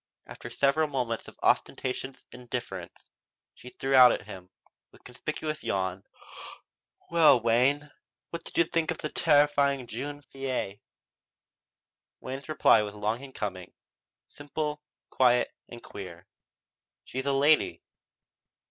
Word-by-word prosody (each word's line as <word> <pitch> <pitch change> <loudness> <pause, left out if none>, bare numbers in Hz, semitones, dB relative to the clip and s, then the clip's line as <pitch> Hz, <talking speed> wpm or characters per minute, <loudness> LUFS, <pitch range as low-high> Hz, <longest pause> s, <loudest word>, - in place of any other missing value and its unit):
After - - -9
several 140 +3 +2
moments 125 -5 -3
of - - -13
ostentatious 130 +1 -1
indifference, 120 -7 -7 0.5
she 125 - -12
threw 135 +2 -3
out 125 -2 +9
at - - -2
him, 90 -1 -10 0.4
with - - -20
a - - -41
conspicuous 155 +5 -5
yawn: 95 0 -2 1.1
"Well, 165 -6 +6
Wayne, 130 +6 +2 0.4
what 170 0 -5
did - - -10
you 170 - +6
think 165 -1 -1
of 165 - -1
the 155 - -4
terrifying 145 -4 +3
jeune 145 +5 -6
fille?" 130 -7 -4 1.4
Wayne's 135 +3 -7
reply 135 -7 +5
was 105 0 -5
long 105 +4 -2
in 135 - -10
coming, 95 -7 -5 0.5
simple, 150 +1 -4 0.3
quiet, 125 -1 +3 0.2
and 120 - -11
queer: 90 -3 -9 0.8
"She's 130 +1 -4
a 140 - +2
lady." 145 +3 +3
130 Hz, 125 wpm, -28 LUFS, 115-145 Hz, 1.4 s, out